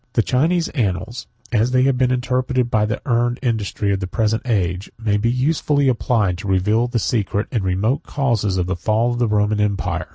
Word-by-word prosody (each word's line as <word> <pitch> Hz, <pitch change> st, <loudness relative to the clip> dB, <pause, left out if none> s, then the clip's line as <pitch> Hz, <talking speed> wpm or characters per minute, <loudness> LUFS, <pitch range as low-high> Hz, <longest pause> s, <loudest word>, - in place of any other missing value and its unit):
The 115 Hz, -, +2 dB
Chinese 165 Hz, +9 st, +1 dB
annals, 115 Hz, -, -3 dB, 0.2 s
as 115 Hz, +1 st, +2 dB
they 130 Hz, 0 st, +3 dB
have 135 Hz, -1 st, +3 dB
been 125 Hz, 0 st, +2 dB
interpreted 125 Hz, 0 st, 0 dB
by 105 Hz, -1 st, +2 dB
the 105 Hz, -, -2 dB
learned 120 Hz, 0 st, +1 dB
industry 105 Hz, -4 st, -1 dB
of 95 Hz, -, -1 dB
the 95 Hz, -, -4 dB
present 110 Hz, +2 st, 0 dB
age, 95 Hz, -4 st, -1 dB
may 110 Hz, -2 st, 0 dB
be 110 Hz, +3 st, +1 dB
usefully 145 Hz, +2 st, +1 dB
applied 110 Hz, -7 st, +1 dB
to 100 Hz, -, -6 dB
reveal 105 Hz, +5 st, +2 dB
the 120 Hz, 0 st, -2 dB
secret 105 Hz, -2 st, -1 dB
and 115 Hz, -6 st, -1 dB
remote 95 Hz, +8 st, 0 dB
causes 110 Hz, -8 st, -1 dB
of 90 Hz, -, 0 dB
the 95 Hz, 0 st, -2 dB
fall 110 Hz, +7 st, 0 dB
of 120 Hz, -, -4 dB
the 120 Hz, -, +2 dB
Roman 105 Hz, 0 st, +1 dB
empire. 100 Hz, -1 st, -1 dB
115 Hz, 200 wpm, -20 LUFS, 100-125 Hz, 0.2 s, they